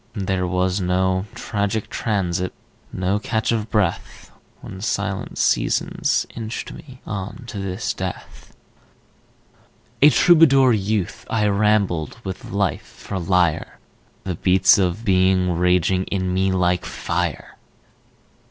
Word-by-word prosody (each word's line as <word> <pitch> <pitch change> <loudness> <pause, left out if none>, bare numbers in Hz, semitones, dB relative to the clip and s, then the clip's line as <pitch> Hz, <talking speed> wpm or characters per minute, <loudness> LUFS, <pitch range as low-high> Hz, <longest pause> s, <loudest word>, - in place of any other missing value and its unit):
There 95 -3 -1
was 90 +2 0
no 95 +1 +1
tragic 105 -2 -2
transit, 90 -4 -2 0.4
No 95 +2 -1
catch 110 +1 -1
of 110 -1 -1
breath, 105 -6 -2 0.3
When 95 - -9
silent 100 -1 -3
seasons - - +1
inched 115 0 -5
me 130 -3 -13
On 100 +4 -6
to 115 -3 -7
this 95 +3 -3
death.... 95 -1 -8 1.4
A 145 - +9
Troubadour 140 -7 +5
youth 105 -2 -2
I 110 -2 +1
rambled 100 -6 +1
With 95 -1 -6
Life 100 0 -1 0.2
for 95 - -5
lyre, 90 -2 0 0.5
The 95 - -3
beats 95 +3 +4
of 95 +4 -1
being 95 -2 +3
raging 90 +1 +2
In 95 -2 -2
me 95 +1 +1
like 90 -1 +1
fire. 85 -2 -3
95 Hz, 115 wpm, -21 LUFS, 90-105 Hz, 1.4 s, A